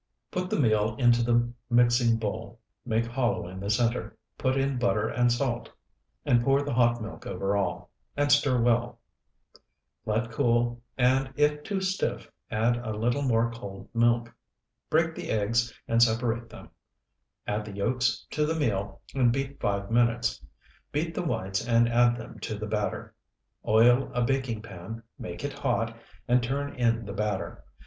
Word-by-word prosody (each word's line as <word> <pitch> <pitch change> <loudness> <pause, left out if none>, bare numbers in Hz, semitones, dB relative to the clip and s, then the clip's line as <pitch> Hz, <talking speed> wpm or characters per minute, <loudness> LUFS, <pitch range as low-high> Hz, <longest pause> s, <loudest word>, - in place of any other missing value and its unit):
Put 180 0 -2
the - - 0
meal 110 -3 +2
into 120 -2 +4
the 120 0 +2 0.2
mixing 120 -1 +4
bowl, 110 +1 -5 0.3
make 115 0 +1
hollow 120 -5 -1
in 95 +1 -8
the 100 +1 -4
center, 115 +3 0 0.2
put 130 0 0
in 135 -1 0
butter 110 -3 +1
and 120 0 +2
salt, 120 -1 -1 0.6
and 120 -1 +3
pour 135 +2 +3
the 145 - -3
hot 120 -1 +3
milk 110 - -8
over 100 +2 -1
all, 100 -3 -2 0.3
and 145 0 +2
stir 145 -3 +4
well. 120 0 +1 1.1
Let 115 +2 0
cool, 120 +1 +1 0.2
and 130 +1 +2
if 150 0 +2
too 195 +4 -3
stiff, 190 - -2 0.2
add 115 +3 +1
a 110 -3 -4
little 120 +5 0
more 115 -3 +2
cold 100 -4 -9
milk. 120 0 +2 0.6
Break 160 +1 +2
the - - -7
eggs 115 +2 +1 0.2
and 115 0 +2
separate 115 0 +2
them; - - -12 0.8
add 105 +1 -1
the 105 -1 -8
yolks 120 +3 0
to 150 0 +1
the 160 - 0
meal 100 -10 -2
and 125 -3 +3
beat 135 +2 -3
five 100 +1 -1
minutes. 115 0 +1 0.5
Beat 165 +3 -1
the - - -2
whites 95 - -2
and 115 0 +4
add 120 0 +3
them 115 0 -9
to 110 - -4
the 105 - -4
batter. 105 -1 -3 0.5
Oil 120 +4 +5
a 125 - +2
baking 125 -4 -1
pan, 110 +2 -8 0.2
make 85 +7 -7
it 145 -1 -3
hot, 115 -4 -1 0.3
and 125 +1 +4
turn 140 +4 -2
in 115 -2 +1
the 100 - -6
batter. 105 -2 -3
120 Hz, 165 wpm, -27 LUFS, 110-130 Hz, 1.1 s, Oil